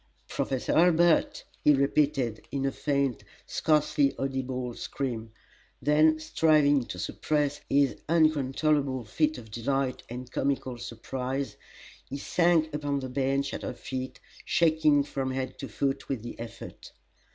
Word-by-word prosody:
"Professor 130 -2 -1
Hurlbut!" 170 -1 +4 0.2
he 150 - +6
repeated, 135 -4 +1
in 135 -1 -2
a 135 - +1
faint, 140 -3 -1 0.2
scarcely 150 -2 +2
audible 130 -2 -3
scream; 115 -4 -4 0.5
then, 155 +2 +4
striving 150 -3 +3
to 90 - -7
suppress 145 +8 -1
his 140 -2 +3
uncontrollable 145 -4 +2
fit 155 +8 0
of 110 -3 -11
delight 130 +3 -1
and 125 +1 -7
comical 130 -3 -1
surprise, 130 +4 -4 0.5
he 140 - -4
sank 165 0 +2
upon 145 -1 -1
the 130 -1 -5
bench 135 +1 0
at - - -4
her - - -4
feet, 130 0 -5 0.2
shaking 155 -3 +3
from 135 -2 -3
head 130 0 -4
to - - -5
foot 135 -1 -2
with 130 -6 -2
the 120 - -8
effort. 115 0 -9
140 Hz, 130 wpm, -28 LUFS, 130-150 Hz, 0.5 s, he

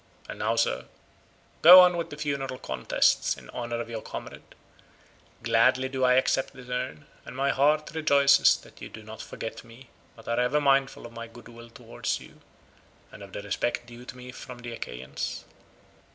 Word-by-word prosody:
And - - -8
now, - - 0
sir, - - 0 0.8
go 180 +3 +11
on 180 -1 +5
with 170 -1 -3
the 145 - -9
funeral 140 -3 -3
contests 65 - +1
in - - -13
honour 120 -1 -4
of 120 - -4
your 115 -2 -6
comrade: - - -9 0.9
gladly 130 +1 +3
do 130 -1 -2
I 125 0 +5
accept 130 +1 +1
this 125 -2 -13
urn, 130 +3 -4 0.2
and - - -10
my 135 +1 +1
heart 150 +3 +2
rejoices 140 -3 +5
that - - -18
you - - -7
do 110 - -11
not 110 0 -9
forget 115 - -7
me 120 +1 -16 0.2
but 115 - -16
are 115 +1 0
ever 125 +5 +2
mindful 135 -2 +1
of 120 - -10
my 115 0 -7
goodwill 115 0 -14
towards - - -4
you, - - -16 0.7
and - - -13
of 100 -1 -11
the 100 - -7
respect 120 +4 -2
due 120 +1 -12
to 125 - -10
me 125 0 -10
from 125 -1 -10
the 120 -1 -8
Achaeans. 65 - -6
125 Hz, 180 wpm, -27 LUFS, 115-135 Hz, 0.9 s, go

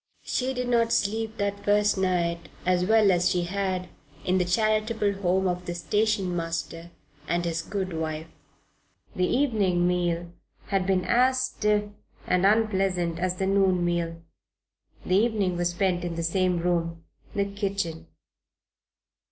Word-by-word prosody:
She 255 +1 -1
did 250 0 -2
not 230 -1 +2
sleep 220 +2 0
that 200 0 -2
first 205 0 +3
night 170 -3 0 0.2
as 180 0 +2
well 215 -1 +5
as 180 0 +2
she 175 -1 +1
had 185 0 -2 0.4
in 185 +1 +2
the 180 - +1
charitable 215 +2 +1
home 190 +1 +2
of 180 0 -3
the 175 - -3
station 195 +1 0
master 165 0 -4 0.4
and 175 0 0
his 165 -1 -1
good 190 0 -4
wife. 160 -1 -3 0.9
The 180 0 +1
evening 205 -10 +2
meal 175 -1 -1 0.4
had 195 -2 0
been 185 -2 +1
as 255 +2 +3
stiff 210 -5 +1 0.4
and 180 +1 +3
unpleasant 195 -6 +1
as 185 0 0
the 190 - -1
noon 190 -2 +2
meal. 170 -1 -1 0.9
The 185 - +3
evening 205 -4 +1
was 175 0 0
spent 175 0 0
in 175 -1 -3
the 170 - -3
same 180 +1 +1
room 170 -1 -1 0.3
the 200 -1 +1
kitchen. 200 -5 -3
185 Hz, 145 wpm, -26 LUFS, 175-205 Hz, 0.9 s, well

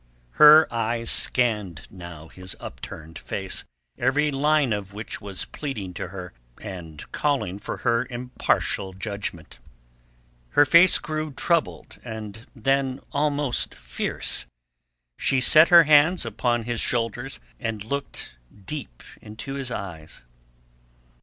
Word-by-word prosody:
Her 155 +1 +9
eyes 115 0 -1
scanned 105 -10 +1
now 85 -4 -10
his 95 0 -7
upturned 80 +1 -9
face, 95 -1 -4 0.3
every 145 +4 +2
line 145 -2 +2
of 100 -1 -5
which 110 +1 -6
was 100 -2 -3
pleading 105 -11 -5
to 90 - -5
her 90 0 -8 0.3
and 85 -7 -8
calling 135 -11 -1
for 115 +3 -1
impartial 120 -5 -1
judgment. 100 - -6 1.0
Her 145 - +8
face 170 +5 +6
grew 155 0 -4
troubled, 165 +4 -1
and 110 -1 -8
then 135 +2 0
almost 145 -3 0
fierce. - - -2 0.7
She 135 - +2
set 155 +6 +7
her 170 -1 +9
hands 155 +2 +5
upon 120 +1 0
his 120 0 -2
shoulders, 120 +2 -2 0.2
and 115 -5 -3
looked 140 - -5 0.3
deep 125 - -7 0.2
into 110 +6 -8
his 135 -2 -4
eyes. 85 - -7
120 Hz, 115 wpm, -24 LUFS, 100-140 Hz, 1.0 s, Her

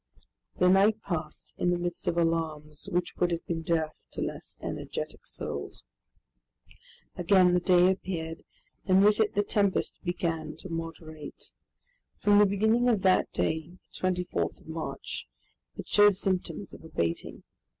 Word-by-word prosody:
The 180 - +4
night 200 +4 +5
passed 160 -4 -4
in 175 - +2
the 175 - +2
midst 175 0 -4
of 170 - +1
alarms 155 -3 -1
which 175 0 -1
would 175 - +2
have 170 -1 -3
been 165 -1 -2
death 160 -1 -2
to - - -4
less - - -6
energetic - - -5
souls. - - -4 1.3
Again 180 0 +5
the 180 - +4
day 180 +1 +5
appeared 165 -4 -4 0.4
and 190 +1 +5
with 210 +1 +4
it 215 -1 +2
the 205 - +3
tempest 200 -2 0
began 165 -3 -2
to 185 - -8
moderate. 165 -2 -7 0.7
From 205 0 +5
the 210 - +7
beginning 220 +5 +3
of 210 -5 +1
that 185 -1 +3
day, 160 +3 -2 0.2
the 185 - -1
24th 180 -1 -1
of - - -19
March, 160 - -5 0.5
it - - -7
showed 205 -1 +6
symptoms 185 -1 -2
of - - -12
abating. 85 - -3
175 Hz, 150 wpm, -29 LUFS, 165-195 Hz, 1.3 s, the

